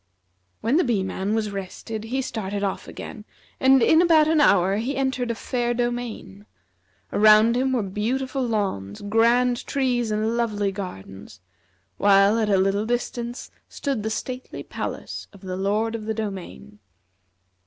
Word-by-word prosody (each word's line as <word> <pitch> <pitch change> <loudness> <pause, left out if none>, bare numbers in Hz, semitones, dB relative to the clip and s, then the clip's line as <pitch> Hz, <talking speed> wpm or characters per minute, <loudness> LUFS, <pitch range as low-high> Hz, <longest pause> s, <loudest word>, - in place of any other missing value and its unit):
'" 90 0 -46
When 235 +7 +2
the 360 - +4
Bee 225 -7 +1
man 190 +2 -2
was 215 -2 -1
rested 200 +3 -6
he 265 +4 -2
started 205 -4 -4
off 195 - -3
again, 215 - -8 0.4
and 265 -1 +5
in 320 +1 +5
about 320 -3 +5
an 315 -1 +3
hour 195 -5 +4
he 250 +6 -2
entered 260 -2 -1
a 235 - -1
fair 240 +1 -2
domain. 240 - -4 0.7
Around 215 +2 +6
him 260 +1 +1
were 240 -4 +1
beautiful 255 +8 -2
lawns, 200 - -2
grand 235 +4 +2
trees, 250 -4 0
and 215 +2 0
lovely 210 -4 0
gardens; 100 - -8 0.6
while 200 +2 +5
at 215 -2 0
a 195 - +4
little 195 +3 +1
distance 240 0 -3 0.2
stood 275 -6 -3
the 220 - -2
stately 255 +3 -5
palace - - -6
of 200 - -15
the 185 -2 -5
Lord 210 +4 0
of 220 -2 -5
the 220 0 -2
Domain. 185 - -6
220 Hz, 155 wpm, -24 LUFS, 195-245 Hz, 0.7 s, Around